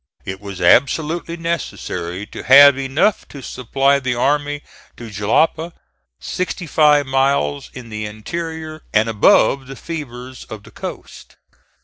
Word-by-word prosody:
It 95 +1 -6
was 100 -2 -8
absolutely 160 - +2
necessary 100 - -4
to - - -9
have 140 +1 +8
enough 135 +10 0
to 140 -2 -11
supply 135 +3 +1
the 130 -2 -2
army 145 +3 0 0.3
to 115 -2 -9
Jalapa, 155 - 0 0.5
sixty 180 0 -4
five 150 -2 +4
miles 135 - 0
in 125 -3 -9
the 105 -1 -5
interior 155 +8 -6
and 110 +1 +3
above 115 +4 +3
the 135 - -8
fevers 130 -5 -8
of 110 -2 -10
the 115 - -15
coast. - - -9
135 Hz, 130 wpm, -19 LUFS, 110-155 Hz, 0.5 s, have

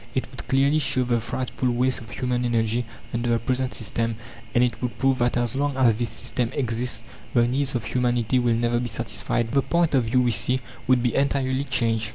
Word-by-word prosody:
It 130 - 0
would 130 - -10
clearly 140 +3 +3
show 130 -3 +1
the 120 -2 0
frightful 130 +2 -2
waste 125 +2 +2
of 110 - -11
human 125 0 -1
energy 115 0 0 0.3
under 120 0 -1
the 115 - +3
present 130 +2 -1
system, 115 +1 -1 0.4
and 120 - +5
it 125 - -1
would 120 -3 -3
prove 135 +1 +2
that 120 0 +1
as 120 0 0
long 140 0 0
as 125 -4 +5
this 115 +2 -1
system 115 +2 -2
exists, 120 -3 -2 0.3
the 120 0 +5
needs 135 +2 0
of 120 - -1
humanity 120 +1 +1
will 120 -2 +2
never 120 +1 +1
be 120 - -2
satisfied. 115 +1 -1
The 140 - +3
point 170 +2 +1
of 130 -4 +3
view, 125 +3 +2
we 120 - +2
see, 120 +3 +1 0.3
would 125 -1 +4
be 120 - +1
entirely 135 -1 +1
changed. 115 -4 0
125 Hz, 215 wpm, -24 LUFS, 115-130 Hz, 0.4 s, and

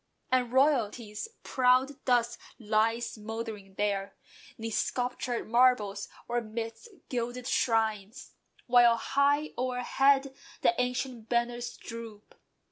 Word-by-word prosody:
And 250 -2 +2
royalty's 245 - +1 0.2
proud 255 +2 +2
dust 240 -2 +2 0.2
lies 225 +1 0
mouldering 215 -3 -6
there, 200 -1 -1 0.4
'Neath 225 0 -5
sculptured 245 +1 -2
marbles, 220 -4 +3 0.2
or 240 0 0
midst 225 - -6 0.2
gilded 245 0 -3
shrines: 220 -3 0 0.3
While 240 -1 +6
high 285 +5 +1
o'erhead 265 +2 +2 0.3
the - - +4
ancient 250 -2 -3
banners 240 0 -1
droop. 230 -2 -9
240 Hz, 100 wpm, -29 LUFS, 220-255 Hz, 0.4 s, While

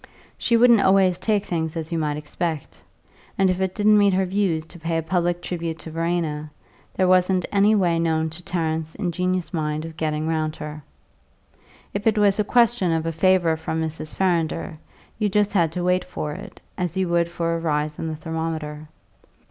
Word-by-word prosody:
She 235 - +2
wouldn't 235 -2 +6
always 190 -2 +4
take 205 0 +1
things 160 -3 -2
as 160 0 -5
you 165 - 0
might 150 -1 -1
expect, 155 0 -4 0.6
and 190 -1 +4
if 185 +1 -2
it 190 -1 -1
didn't 210 0 +5
meet 200 -2 +4
her 190 0 +2
views 180 -4 0
to 175 +2 -14
pay 165 0 -1
a 165 - -1
public 175 0 0
tribute 165 -2 -3
to 160 - -10
Verena, 165 -2 -2 0.5
there 185 - +2
wasn't 185 0 +3
any 205 +2 +4
way 175 -4 +2
known 160 -1 +1
to 160 +3 -9
Tarrant's 160 -2 -2
ingenious 180 -1 -1
mind 155 -1 -2
of 165 -1 -8
getting 155 0 -1
round 155 -1 -1
her. 150 0 -7 1.1
If 200 +2 -2
it 220 -1 +3
was 205 -1 +3
a - - +4
question 235 -5 +3
of 160 0 0
a 165 - 0
favour 175 0 +3
from 160 0 -3
Mrs. 160 -1 -4
Farrinder, 165 -4 0 0.4
you 210 -2 +1
just 205 +1 +1
had 170 -5 +2
to 180 - -2
wait 180 0 +2
for 150 - -5
it, 150 - -9 0.2
as 180 0 -2
you 190 -1 +1
would 170 0 +2
for 170 -1 -1
a 165 - -1
rise 150 -2 -1
in 165 - -3
the 160 - -3
thermometer. 160 -1 -4
170 Hz, 195 wpm, -23 LUFS, 160-190 Hz, 1.1 s, wouldn't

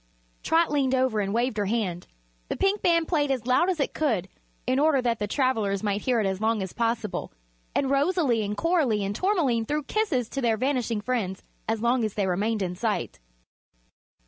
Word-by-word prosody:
Trot 325 0 +2
leaned 270 -3 +2
over 255 -4 +1
and 200 -1 -1
waved 235 +1 0
her 205 -1 0
hand. 195 -6 -2 0.4
The - - -2
Pink 390 +1 +1
Band 335 -2 +3
played 295 -4 +1
as 255 -4 -1
loud 255 +9 +3
as 360 -4 -1
it 280 - 0
could 220 - 0 0.4
in 255 +1 +1
order 300 -2 +4
that 240 -2 0
the 210 - -1
travelers 220 -6 0
might 205 0 0
hear 250 -3 +1
it 215 - +1
as 190 +1 -2
long 220 -2 +1
as 190 - -6
possible 230 -3 -2 0.4
and 275 - +1
Rosalie 280 -3 +2
and 205 0 -3
Coralie 290 - +1
and 200 +1 -3
Tourmaline 285 - +1
threw 300 0 -1
kisses 285 - 0
to 275 - -3
their 230 -3 +2
vanishing 245 -4 0
friends 205 -6 -2 0.3
as 225 0 -1
long 240 0 +2
as 215 -2 -2
they 205 - +1
remained 205 +3 0
in 180 -1 -2
sight. 180 - -2
235 Hz, 200 wpm, -26 LUFS, 210-280 Hz, 0.4 s, order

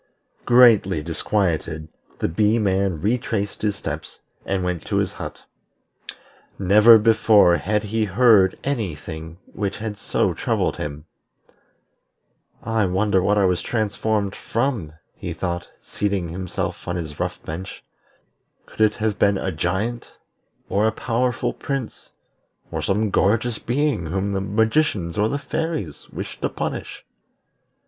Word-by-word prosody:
Greatly 110 -9 +5
disquieted, 80 -2 -1 0.3
the - - 0
Bee 105 +7 +2
man 95 -5 +1
retraced 110 -1 -1
his 105 -2 0
steps, - - -6 0.3
and 95 -1 0
went 90 -3 -2
to - - -1
his - - 0
hut. - - -8 1.1
Never 105 +4 +7
before 110 -5 +5
had 105 +2 -1
he 110 +1 0
heard 105 -1 +4
any 115 - -1
thing 80 +2 -8 0.2
which 100 -2 -3
had 110 -1 -5
so - - 0
troubled - - -1
him. 75 +1 -5 1.6
"I 115 -1 +1
wonder 95 +1 +2
what 105 +3 +2
I 100 - +4
was 90 -1 +1
transformed 105 -2 -1
from?" 115 - -2 0.2
he - - -6
thought, 85 -1 -4
seating 100 -4 -2
himself 90 +1 -4
on 90 - -1
his 80 -4 -5
rough - - -2
bench. 90 +5 -7 0.8
"Could - - -8
it 110 -1 +4
have 110 -1 -1
been 100 -1 +3
a 95 - -2
giant, 95 +9 -2 0.5
or 105 +2 +2
a - - +2
powerful 120 +2 -1
prince, 135 -5 -5 0.6
or - - -2
some 105 +1 0
gorgeous 110 +4 +1
being 130 - 0
whom 95 +4 -1
the 95 - -1
magicians 105 - +1
or 105 +1 +3
the 140 - -1
fairies 145 - -4
wished - - -7
to - - 0
punish? - - -5
100 Hz, 135 wpm, -22 LUFS, 90-110 Hz, 1.6 s, Never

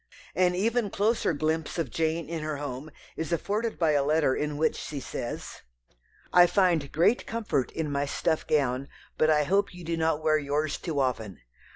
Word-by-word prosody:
An 180 +1 +2
even 220 +3 +1
closer 215 +3 +1
glimpse 155 +1 -1
of 160 -8 -2
Jane 160 0 -1
in 165 0 -4
her 155 -1 -3
home 140 +1 -5 0.3
is 160 +1 -4
afforded 210 +7 -1
by 160 -2 +3
a 145 -2 +3
letter 150 -2 +2
in 150 +1 -2
which 155 - +1
she 145 - -5
says 120 -2 -6 0.7
"I 175 0 +8
find 175 -8 +2
great 175 +9 +2
comfort 220 - -1
in 155 -3 -2
my 140 0 0
stuff 160 +2 -1
gown, 135 -2 +1 0.3
but 155 - +4
I 150 -1 +4
hope 195 +4 +1
you 180 - -10
do 165 0 -2
not 160 -1 0
wear 155 -1 +3
yours 145 +1 -1
too 160 -5 -3
often. 110 - -2
155 Hz, 185 wpm, -27 LUFS, 145-175 Hz, 0.7 s, I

